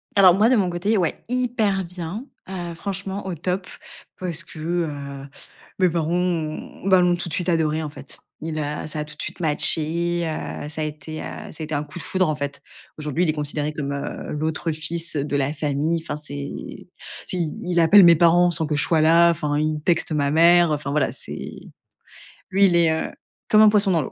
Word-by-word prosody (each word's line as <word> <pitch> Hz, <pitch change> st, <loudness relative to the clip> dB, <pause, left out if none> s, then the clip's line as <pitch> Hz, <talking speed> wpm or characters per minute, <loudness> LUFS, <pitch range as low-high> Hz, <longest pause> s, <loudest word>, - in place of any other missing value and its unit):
Alors 190 Hz, -3 st, +7 dB
moi, 210 Hz, +5 st, +3 dB
de 260 Hz, -, +4 dB
mon 195 Hz, -5 st, +1 dB
côté, 190 Hz, +5 st, 0 dB
ouais, 175 Hz, -4 st, -1 dB
hyper 230 Hz, -6 st, 0 dB
bien, 180 Hz, +6 st, -6 dB, 0.2 s
heu, 175 Hz, -3 st, -5 dB
franchement, 195 Hz, +2 st, -5 dB
au 185 Hz, -, -3 dB
top 180 Hz, +3 st, -3 dB, 0.5 s
parce 170 Hz, -3 st, -3 dB
que, 165 Hz, -, -13 dB
heu, 145 Hz, -4 st, -4 dB, 0.5 s
mes 185 Hz, -2 st, +3 dB
parents, 165 Hz, -1 st, -1 dB
ont 175 Hz, 0 st, -3 dB
ben, 190 Hz, -2 st, +5 dB
l'ont 175 Hz, 0 st, +3 dB
tout 175 Hz, 0 st, -5 dB
de -, -, -6 dB
suite 180 Hz, 0 st, -2 dB
adoré 160 Hz, -2 st, +1 dB
en 150 Hz, -, -4 dB
fait. 140 Hz, -, -11 dB, 0.2 s
Il 160 Hz, 0 st, -4 dB
a 150 Hz, 0 st, -3 dB
ça 155 Hz, -, -5 dB
a 150 Hz, -, -2 dB
tout 150 Hz, -, -12 dB
de -, -, -8 dB
suite -, -, -6 dB
matché, 165 Hz, +2 st, +4 dB
heu, 155 Hz, -2 st, -5 dB
ça 155 Hz, 0 st, -4 dB
a -, -, +1 dB
été, 155 Hz, +1 st, -6 dB
heu, -, -, -6 dB, 0.3 s
ça -, -, -12 dB
a -, -, -4 dB
été 155 Hz, 0 st, -3 dB
un 145 Hz, -, -1 dB
coup 150 Hz, +4 st, -10 dB
de -, -, -7 dB
foudre, 185 Hz, -2 st, 0 dB
en 155 Hz, -, 0 dB
fait. 140 Hz, 0 st, -5 dB, 0.4 s
Aujourd'hui, 150 Hz, +2 st, -1 dB
il 175 Hz, -, +1 dB
est -, -, +2 dB
considéré 150 Hz, 0 st, -2 dB
comme, 140 Hz, -2 st, -4 dB
heu, 140 Hz, -, -5 dB
l'autre 155 Hz, +2 st, -2 dB
fils 165 Hz, +2 st, -3 dB
de 145 Hz, 0 st, -2 dB
la 140 Hz, +1 st, +1 dB
famille. 155 Hz, +2 st, -1 dB
Enfin 165 Hz, -, -4 dB
c'est 145 Hz, -1 st, -6 dB, 0.8 s
tu 185 Hz, -, -1 dB
sais 175 Hz, -, +1 dB, 0.2 s
il 175 Hz, -1 st, +1 dB
appelle 190 Hz, +5 st, +7 dB
mes 170 Hz, -1 st, +8 dB
parents 175 Hz, +2 st, +4 dB
sans 165 Hz, -1 st, +1 dB
que 150 Hz, 0 st, -2 dB
je 145 Hz, -, +3 dB
sois 160 Hz, -2 st, +2 dB
là, 165 Hz, +2 st, +6 dB
enfin, 150 Hz, -3 st, -1 dB
il 155 Hz, 0 st, -1 dB
texte 170 Hz, -1 st, +2 dB
ma 145 Hz, -2 st, 0 dB
mère. 170 Hz, +1 st, +5 dB
Enfin 145 Hz, -1 st, -2 dB
voilà, 150 Hz, 0 st, +1 dB
c'est -, -, -8 dB, 1.1 s
lui, 195 Hz, +1 st, +5 dB
il 175 Hz, -2 st, +2 dB
est, 170 Hz, -1 st, +4 dB
heu, 160 Hz, -, -2 dB, 0.4 s
comme 215 Hz, 0 st, +6 dB
un 215 Hz, -, +8 dB
poisson 205 Hz, -2 st, +3 dB
dans 165 Hz, -4 st, +2 dB
l'eau -, -, -6 dB
165 Hz, 220 wpm, -22 LUFS, 150-180 Hz, 1.1 s, mes